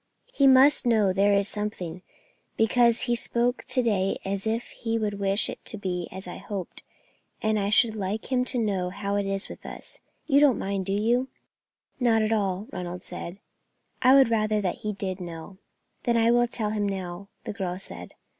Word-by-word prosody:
He 275 Hz, -, +4 dB
must 265 Hz, 0 st, +6 dB
know 215 Hz, -5 st, +3 dB
there 200 Hz, +1 st, +3 dB
is 200 Hz, 0 st, +2 dB
something, 185 Hz, -5 st, -4 dB, 0.6 s
because 235 Hz, +1 st, +3 dB
he 240 Hz, -1 st, +1 dB
spoke 240 Hz, +1 st, 0 dB
to 255 Hz, 0 st, 0 dB
day 195 Hz, -4 st, +1 dB
as 195 Hz, +2 st, -2 dB
if 225 Hz, +2 st, -2 dB
he 225 Hz, -1 st, -3 dB
would 205 Hz, -2 st, -2 dB
wish 195 Hz, +1 st, +2 dB
it -, -, -7 dB
to 215 Hz, -, -2 dB
be 180 Hz, -3 st, -3 dB
as 190 Hz, 0 st, -8 dB
I 180 Hz, -, -7 dB
hoped, 195 Hz, -2 st, -6 dB, 0.6 s
and 220 Hz, -1 st, +1 dB
I 200 Hz, 0 st, 0 dB
should 220 Hz, +1 st, +4 dB
like 210 Hz, +3 st, -4 dB
him 250 Hz, -1 st, +3 dB
to 255 Hz, -, 0 dB
know 195 Hz, -6 st, 0 dB
how 200 Hz, +1 st, -3 dB
it 200 Hz, -1 st, 0 dB
is 195 Hz, 0 st, -2 dB
with -, -, -11 dB
us. -, -, -8 dB, 0.3 s
You 280 Hz, -2 st, +4 dB
do 295 Hz, -, +7 dB
not 260 Hz, -, +1 dB
mind, 195 Hz, -1 st, -2 dB
do 195 Hz, -, 0 dB
you?" 235 Hz, +5 st, +1 dB, 0.7 s
"Not 230 Hz, -3 st, +3 dB
at 215 Hz, +1 st, +1 dB
all," 200 Hz, -2 st, -1 dB
Ronald 180 Hz, 0 st, -5 dB
said. 175 Hz, +3 st, -7 dB, 0.6 s
"I 260 Hz, +1 st, +7 dB
would 270 Hz, -4 st, +6 dB
rather 215 Hz, -1 st, +2 dB
that 185 Hz, -4 st, -2 dB
he 210 Hz, -, -3 dB
did 190 Hz, -1 st, -4 dB
know." 175 Hz, +2 st, -8 dB, 0.5 s
"Then 235 Hz, -1 st, +2 dB
I 230 Hz, 0 st, +4 dB
will 240 Hz, 0 st, +4 dB
tell 215 Hz, -3 st, -2 dB
him 205 Hz, -1 st, 0 dB
now," 190 Hz, 0 st, -5 dB, 0.2 s
the -, -, -5 dB
girl 185 Hz, -4 st, -3 dB
said. 195 Hz, -, -9 dB
210 Hz, 200 wpm, -26 LUFS, 195-235 Hz, 0.7 s, do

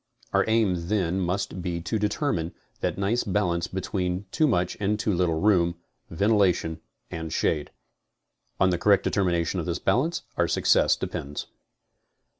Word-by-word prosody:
Our -, -, +4 dB
aim 100 Hz, -7 st, +1 dB
then 95 Hz, -3 st, 0 dB
must 95 Hz, +1 st, -2 dB
be 85 Hz, -1 st, -2 dB
to 110 Hz, +6 st, -2 dB
determine 105 Hz, -, -1 dB, 0.2 s
that -, -, -2 dB
nice 100 Hz, +5 st, +1 dB
balance 90 Hz, -4 st, 0 dB
between 95 Hz, 0 st, -2 dB
too 155 Hz, -1 st, +3 dB
much 90 Hz, -8 st, +1 dB
and 105 Hz, +1 st, +1 dB
too 105 Hz, -1 st, 0 dB
little 85 Hz, -3 st, +1 dB
room, 90 Hz, -3 st, +3 dB, 0.3 s
ventilation 90 Hz, -4 st, +2 dB, 0.3 s
and 80 Hz, -1 st, -5 dB
shade. 75 Hz, -2 st, 0 dB, 0.9 s
On 95 Hz, -1 st, +4 dB
the 90 Hz, -, 0 dB
correct 100 Hz, 0 st, +4 dB
determination 90 Hz, -2 st, 0 dB
of 85 Hz, -, -4 dB
this 85 Hz, 0 st, -1 dB
balance 155 Hz, -, 0 dB
our -, -, +2 dB
success -, -, +3 dB
depends. 70 Hz, +1 st, -5 dB
90 Hz, 145 wpm, -26 LUFS, 85-105 Hz, 0.9 s, Our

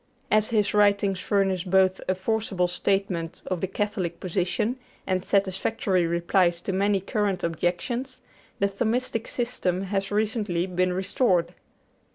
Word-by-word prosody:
As 215 Hz, 0 st, +4 dB
his 210 Hz, -3 st, +1 dB
writings 200 Hz, -2 st, +3 dB
furnish 195 Hz, -3 st, +1 dB
both 190 Hz, 0 st, +3 dB
a 185 Hz, -, +2 dB
forcible 190 Hz, -2 st, 0 dB
statement 180 Hz, -2 st, -1 dB
of 185 Hz, -3 st, -3 dB
the 190 Hz, -, 0 dB
Catholic 185 Hz, -4 st, -2 dB
position 185 Hz, +6 st, -1 dB, 0.3 s
and 185 Hz, -1 st, 0 dB
satisfactory 195 Hz, -2 st, +1 dB
replies 170 Hz, +1 st, +2 dB
to 195 Hz, -, -3 dB
many 200 Hz, +1 st, +2 dB
current 200 Hz, -2 st, -1 dB
objections, 235 Hz, +11 st, -2 dB, 0.4 s
the 200 Hz, -, +2 dB
Thomistic 225 Hz, +3 st, -1 dB
system 195 Hz, -7 st, -1 dB
has 195 Hz, 0 st, -2 dB
recently 210 Hz, -4 st, 0 dB
been 185 Hz, 0 st, 0 dB
restored. 180 Hz, -2 st, +1 dB
195 Hz, 130 wpm, -26 LUFS, 180-210 Hz, 0.4 s, As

